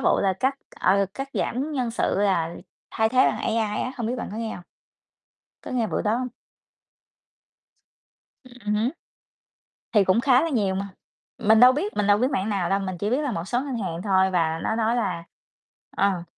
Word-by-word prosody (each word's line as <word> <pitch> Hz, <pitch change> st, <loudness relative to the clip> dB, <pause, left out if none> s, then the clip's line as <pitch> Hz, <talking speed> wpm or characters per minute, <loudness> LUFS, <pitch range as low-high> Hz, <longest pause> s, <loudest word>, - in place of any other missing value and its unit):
vụ -, -, +3 dB
là 195 Hz, -1 st, +2 dB
cắt, 260 Hz, +9 st, 0 dB, 0.3 s
ờ, 195 Hz, +1 st, +3 dB
cắt 270 Hz, +3 st, -5 dB
giảm 275 Hz, +6 st, -2 dB
nhân 250 Hz, -5 st, -1 dB
sự 225 Hz, -, 0 dB
là 180 Hz, -5 st, +1 dB, 0.4 s
thay 220 Hz, 0 st, +1 dB
thế 255 Hz, -, -2 dB
bằng -, -, 0 dB
AI 225 Hz, -, -1 dB, 0.3 s
á, 255 Hz, -, -3 dB
hông 235 Hz, -4 st, -3 dB
biết 245 Hz, -, -1 dB
bạn -, -, -4 dB
có -, -, -5 dB
nghe 225 Hz, 0 st, -3 dB
hông? 175 Hz, -, -10 dB, 1.0 s
Có -, -, -8 dB
nghe 240 Hz, -4 st, 0 dB
bữa -, -, -1 dB
đó 215 Hz, +2 st, +1 dB
hông? 255 Hz, -, -2 dB, 2.2 s
Ừm 240 Hz, -4 st, -4 dB
hứm. 220 Hz, +5 st, +1 dB, 1.0 s
Thì 205 Hz, -3 st, +5 dB
cũng 190 Hz, +5 st, +3 dB
khá 255 Hz, +1 st, +4 dB
là 330 Hz, -, 0 dB
nhiều 205 Hz, -9 st, 0 dB
mà, 195 Hz, +1 st, -3 dB, 0.5 s
mình 220 Hz, 0 st, +4 dB
đâu 250 Hz, +1 st, +9 dB
biết, 345 Hz, +10 st, -2 dB
mình 205 Hz, -, +1 dB
đâu 205 Hz, 0 st, +5 dB
biết 255 Hz, +4 st, +1 dB
mảng 215 Hz, -6 st, -1 dB
nào 195 Hz, -4 st, 0 dB
đâu, 195 Hz, -, +3 dB
mình 185 Hz, -2 st, -4 dB
chỉ 205 Hz, +3 st, -1 dB
biết 260 Hz, +5 st, +1 dB
là 285 Hz, -4 st, -1 dB
một 165 Hz, -4 st, -3 dB
số 240 Hz, +6 st, -1 dB
ngân 270 Hz, -4 st, -4 dB
hàng 175 Hz, -5 st, -4 dB
thôi 190 Hz, -1 st, +3 dB
và 165 Hz, -3 st, +1 dB
nó 220 Hz, -, -1 dB
nói 230 Hz, +1 st, +1 dB
là 200 Hz, -7 st, -2 dB, 0.7 s
ờ. 195 Hz, -3 st, +1 dB
220 Hz, 205 wpm, -24 LUFS, 190-250 Hz, 2.2 s, đâu